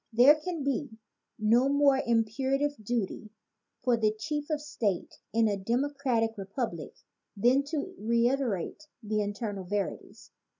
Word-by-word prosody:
There 245 Hz, +6 st, +8 dB
can 310 Hz, 0 st, -4 dB
be 275 Hz, -4 st, -2 dB, 0.4 s
no 230 Hz, +5 st, +3 dB
more 280 Hz, -1 st, +4 dB
imperative 260 Hz, +4 st, 0 dB
duty 215 Hz, -1 st, -2 dB, 0.5 s
for 245 Hz, -1 st, +3 dB
the 215 Hz, -1 st, +2 dB
chief 295 Hz, +7 st, -4 dB
of 305 Hz, -1 st, 0 dB
state 230 Hz, -11 st, -3 dB
in 225 Hz, +1 st, +3 dB
a 205 Hz, -, +1 dB
demo 235 Hz, +8 st, 0 dB
cratic 235 Hz, -6 st, -1 dB
republic 195 Hz, -, -4 dB, 0.4 s
than 245 Hz, +6 st, +4 dB
to 295 Hz, 0 st, -3 dB
reiterate 235 Hz, -, 0 dB, 0.2 s
the 215 Hz, 0 st, 0 dB
eternal 205 Hz, -1 st, -3 dB
veri 200 Hz, +2 st, -2 dB
ties. -, -, -18 dB
235 Hz, 135 wpm, -29 LUFS, 215-280 Hz, 0.5 s, There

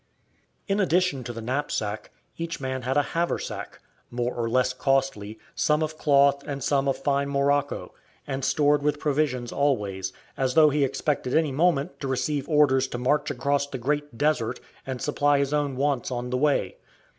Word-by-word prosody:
In 200 Hz, 0 st, +1 dB
addition 180 Hz, -7 st, +2 dB
to -, -, -4 dB
the 115 Hz, -1 st, -7 dB
knapsack, 110 Hz, -5 st, -2 dB, 0.3 s
each 165 Hz, 0 st, -4 dB
man 130 Hz, -1 st, -3 dB
had 130 Hz, +3 st, -1 dB
a 145 Hz, -, +4 dB
haversack, 170 Hz, +1 st, -3 dB, 0.3 s
more 120 Hz, 0 st, -2 dB
or 115 Hz, -1 st, -2 dB
less 125 Hz, +1 st, +2 dB
costly, 130 Hz, -6 st, 0 dB, 0.2 s
some 150 Hz, +1 st, +2 dB
of 155 Hz, 0 st, -3 dB
cloth 140 Hz, -1 st, +4 dB
and 140 Hz, -3 st, -4 dB
some 140 Hz, 0 st, +1 dB
of 135 Hz, -1 st, +1 dB
fine 140 Hz, 0 st, 0 dB
morocco, 140 Hz, +1 st, 0 dB, 0.3 s
and 135 Hz, -1 st, -4 dB
stored 145 Hz, +2 st, +3 dB
with 150 Hz, 0 st, +1 dB
provisions 135 Hz, -5 st, 0 dB
always, 100 Hz, -9 st, 0 dB, 0.2 s
as 130 Hz, -1 st, -1 dB
though 155 Hz, -2 st, +7 dB
he 145 Hz, 0 st, +2 dB
expected 135 Hz, -1 st, -1 dB
any 160 Hz, -2 st, +2 dB
moment 140 Hz, -2 st, +1 dB
to 135 Hz, -, -4 dB
receive 140 Hz, +2 st, -1 dB
orders 140 Hz, -4 st, +4 dB
to 125 Hz, -, -5 dB
march 135 Hz, +5 st, +1 dB
across 140 Hz, +2 st, 0 dB
the 140 Hz, -, -5 dB
Great 145 Hz, 0 st, -2 dB
Desert, 130 Hz, -5 st, 0 dB, 0.3 s
and 130 Hz, -2 st, -4 dB
supply 145 Hz, -1 st, +2 dB
his 140 Hz, +1 st, 0 dB
own 145 Hz, -2 st, 0 dB
wants 140 Hz, -1 st, 0 dB
on 125 Hz, -1 st, -4 dB
the 125 Hz, -, +1 dB
way. 150 Hz, -, +1 dB
140 Hz, 175 wpm, -26 LUFS, 130-145 Hz, 0.3 s, though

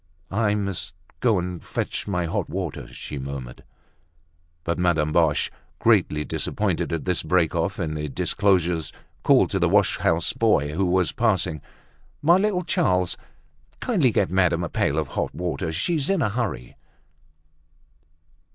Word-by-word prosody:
"I 105 Hz, +1 st, +1 dB
must 95 Hz, -3 st, -3 dB, 0.2 s
go 115 Hz, -5 st, +3 dB
and 90 Hz, -1 st, -4 dB
fetch -, -, -3 dB
my 90 Hz, -4 st, -1 dB
hot 80 Hz, -, -2 dB
water," -, -, -4 dB
she 70 Hz, -, -7 dB
murmured. 65 Hz, -2 st, -7 dB, 1.0 s
But 85 Hz, +1 st, -2 dB
Madame 80 Hz, -4 st, +2 dB
Boche, 80 Hz, -3 st, +2 dB, 0.3 s
greatly 75 Hz, 0 st, +2 dB
disappointed -, -, -1 dB
at 80 Hz, -2 st, -2 dB
this 90 Hz, -2 st, +1 dB
break 90 Hz, -3 st, +2 dB
off -, -, -1 dB
in 75 Hz, -1 st, -2 dB
the 75 Hz, -1 st, -3 dB
disclosures, 85 Hz, 0 st, +1 dB, 0.3 s
called -, -, +4 dB
to -, -, 0 dB
the -, -, +2 dB
wash -, -, +3 dB
house -, -, +1 dB
boy, 75 Hz, +1 st, +2 dB
who 95 Hz, +3 st, +1 dB
was 90 Hz, 0 st, +2 dB
passing, 95 Hz, -, 0 dB, 0.6 s
"My 170 Hz, +4 st, +5 dB
little 190 Hz, -2 st, +1 dB
Charles, 125 Hz, -, +1 dB, 0.6 s
kindly 185 Hz, -, +2 dB
get 95 Hz, -, +1 dB
madame 90 Hz, -2 st, +2 dB
a 85 Hz, -, -3 dB
pail 70 Hz, -, 0 dB
of 75 Hz, -3 st, -1 dB
hot -, -, -3 dB
water; 90 Hz, -1 st, -2 dB
she's 140 Hz, -, 0 dB
in 195 Hz, -6 st, +2 dB
a 110 Hz, -, +1 dB
hurry." 105 Hz, -, -3 dB
90 Hz, 150 wpm, -24 LUFS, 80-105 Hz, 1.0 s, My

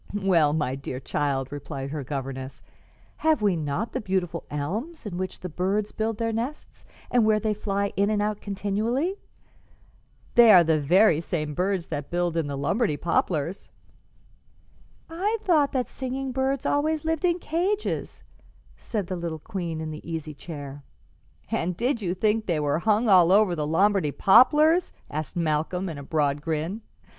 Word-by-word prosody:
"Why, 185 Hz, -7 st, +3 dB
my 150 Hz, -4 st, 0 dB
dear 135 Hz, -1 st, -5 dB
child," 135 Hz, -1 st, -2 dB
replied 140 Hz, -1 st, -6 dB
her 150 Hz, -2 st, -4 dB
governess, 135 Hz, -1 st, -6 dB, 0.5 s
"have 315 Hz, -8 st, +2 dB
we 200 Hz, -3 st, +3 dB
not 155 Hz, +8 st, -2 dB
the -, -, -3 dB
beautiful 185 Hz, -4 st, -2 dB
elms, 215 Hz, -, -4 dB
in 200 Hz, -4 st, -5 dB
which 185 Hz, +1 st, -4 dB
the 180 Hz, -, -4 dB
birds 190 Hz, +5 st, -1 dB
build 220 Hz, 0 st, -2 dB
their 230 Hz, 0 st, -1 dB
nests 245 Hz, +7 st, -5 dB, 0.2 s
and 245 Hz, -2 st, +4 dB
where 215 Hz, 0 st, +3 dB
they 215 Hz, 0 st, 0 dB
fly 200 Hz, -1 st, -2 dB
in 200 Hz, +1 st, +2 dB
and 215 Hz, -1 st, +1 dB
out 210 Hz, 0 st, -1 dB
continually? 220 Hz, -, -1 dB, 1.1 s
They 235 Hz, -2 st, +8 dB
are 180 Hz, -4 st, +8 dB
the 160 Hz, -1 st, +2 dB
very 165 Hz, +2 st, +4 dB
same 155 Hz, -3 st, -3 dB
birds 185 Hz, +2 st, 0 dB
that 145 Hz, -1 st, -4 dB
build 175 Hz, -1 st, -1 dB
in 165 Hz, -3 st, 0 dB
the 140 Hz, -1 st, -4 dB
Lombardy 195 Hz, -, 0 dB
poplars." 170 Hz, +1 st, -1 dB, 1.4 s
"I 390 Hz, +7 st, -1 dB
thought 305 Hz, -6 st, +3 dB
that 255 Hz, -2 st, 0 dB
singing 265 Hz, 0 st, -4 dB
birds 265 Hz, +1 st, -1 dB
always 310 Hz, +2 st, 0 dB
lived 320 Hz, 0 st, -1 dB
in 350 Hz, -1 st, +2 dB
cages," 360 Hz, +5 st, -2 dB, 0.5 s
said 210 Hz, -4 st, -4 dB
the 185 Hz, -, -4 dB
little 170 Hz, -2 st, -4 dB
queen 170 Hz, -2 st, -5 dB
in 160 Hz, 0 st, -4 dB
the 155 Hz, +2 st, -8 dB
easy 160 Hz, -2 st, -4 dB
chair. 145 Hz, -2 st, -8 dB, 0.7 s
"And 170 Hz, +1 st, -1 dB
did 240 Hz, +1 st, 0 dB
you 180 Hz, -2 st, -1 dB
think 215 Hz, +3 st, +1 dB
they 170 Hz, -4 st, +1 dB
were 145 Hz, +1 st, 0 dB
hung 215 Hz, +4 st, +2 dB
all 180 Hz, -4 st, +6 dB
over 200 Hz, -2 st, +4 dB
the 150 Hz, -2 st, -2 dB
Lombardy 190 Hz, -1 st, +2 dB
poplars?" 305 Hz, -, +5 dB, 0.2 s
asked 155 Hz, +3 st, -4 dB
Malcolm, 170 Hz, +3 st, -1 dB
in 155 Hz, -3 st, -6 dB
a -, -, -8 dB
broad 145 Hz, -1 st, 0 dB
grin. 165 Hz, +7 st, -3 dB
185 Hz, 165 wpm, -25 LUFS, 155-225 Hz, 1.4 s, They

